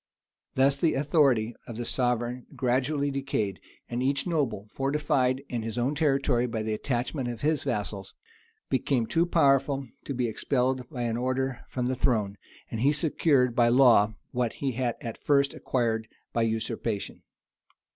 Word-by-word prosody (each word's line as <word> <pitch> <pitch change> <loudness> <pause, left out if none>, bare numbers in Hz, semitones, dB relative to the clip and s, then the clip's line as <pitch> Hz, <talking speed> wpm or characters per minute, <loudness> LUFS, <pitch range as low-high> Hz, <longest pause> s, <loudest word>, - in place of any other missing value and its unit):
Thus 135 +1 +3
the 160 +2 +2
authority 135 -6 +2
of 115 - -7
the 120 - -3
sovereign 125 0 -1
gradually 140 +3 0
decayed; 110 -8 -2 0.3
and 120 +1 -3
each 135 +1 +1
noble, 130 - -1
fortified 135 -2 +1
in 120 -2 -3
his 110 +1 -5
own 125 +4 +1
territory 135 -5 +2
by 115 -2 -3
the 110 0 -1
attachment 125 +3 -2
of 120 -2 -5
his 155 -1 +1
vassals, 100 -2 -3 0.5
became 130 -2 +1
too 165 +10 +1
powerful 140 -4 +3 0.2
to 140 - -4
be 125 -1 0
expelled 125 +2 -1
by 125 -4 -4
an 115 -1 -1
order 130 +1 -1
from 125 -1 -2
the 130 +1 0
throne; 110 -6 0 0.3
and 115 - -3
he 140 +3 +4
secured 145 -5 +2
by 120 -2 +4
law 120 -4 +5 0.2
what 120 -2 -1
he 135 -2 -2
had 125 -1 -1
at 115 -2 -7
first 140 -2 +3
acquired 115 -3 -1 0.3
by 115 - +1
usurpation. 110 -1 -2
125 Hz, 155 wpm, -27 LUFS, 115-140 Hz, 0.5 s, law